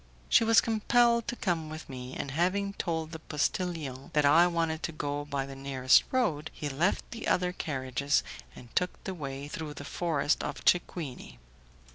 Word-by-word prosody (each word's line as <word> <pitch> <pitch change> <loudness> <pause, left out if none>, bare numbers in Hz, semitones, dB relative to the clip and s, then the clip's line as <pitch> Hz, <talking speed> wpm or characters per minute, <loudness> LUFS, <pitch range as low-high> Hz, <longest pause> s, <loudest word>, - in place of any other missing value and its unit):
She - - +6
was 225 0 +6
compelled 235 +1 +3
to 240 - -2
come 170 -8 -1
with 155 +1 -8
me, 130 -1 -7
and 140 - -4
having 185 +6 0
told 160 -4 -3
the 160 - -6
postillion 150 -3 -2
that 150 -1 +3
I 165 +5 +7
wanted 165 -2 -1
to - - -2
go 145 -1 -3
by 140 -2 -2
the 135 0 -9
nearest 135 -1 +3
road, 170 - 0
he 150 - -4
left 155 +8 0
the 230 - -5
other 180 0 +2
carriages, 140 -3 0 0.3
and 120 - -14
took 180 0 -1
the 190 - -4
way 140 -4 -6
through 150 0 -6
the 145 - -8
forest 155 -2 0
of - - -5
Cequini. 165 - 0
155 Hz, 175 wpm, -30 LUFS, 140-180 Hz, 0.3 s, I